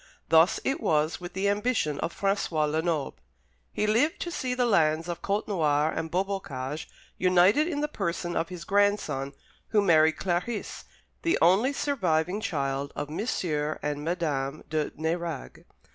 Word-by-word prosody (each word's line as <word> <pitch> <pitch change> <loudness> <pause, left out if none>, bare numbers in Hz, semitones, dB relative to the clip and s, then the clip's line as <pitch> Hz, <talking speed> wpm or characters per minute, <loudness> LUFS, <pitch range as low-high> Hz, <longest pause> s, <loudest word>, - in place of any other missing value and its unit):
Thus 165 +2 +5
it 275 +5 -1
was 155 +2 +1
with 175 0 -7
the 195 +2 0
ambition 205 - 0
of 170 - -4
François 195 -6 +1
Lenoble. 160 -1 -1 0.5
He - - -1
lived 255 - +2
to 345 - -3
see 255 -6 -2
the 250 -1 +2
lands 165 -6 +2
of 175 -1 -4
Côtenoir 160 -7 +1
and 160 - -3
Beaubocage 160 -7 -3 0.3
united 185 - +4
in 295 -4 -2
the 300 - +1
person 175 - -3
of 165 0 -1
his 180 -2 -7
grandson, 195 -9 +1 0.3
who 215 - +2
married 160 -3 +4
Clarice, 190 +5 -3 0.4
the 335 - +2
only 195 +10 +4
surviving 190 - 0
child 140 -7 -2
of 145 - -4
M. 155 - -4 0.6
and 145 0 -2
Madame 155 -4 -2
de 155 -2 0
Nérague. 165 -1 -4
175 Hz, 145 wpm, -27 LUFS, 155-205 Hz, 0.6 s, Thus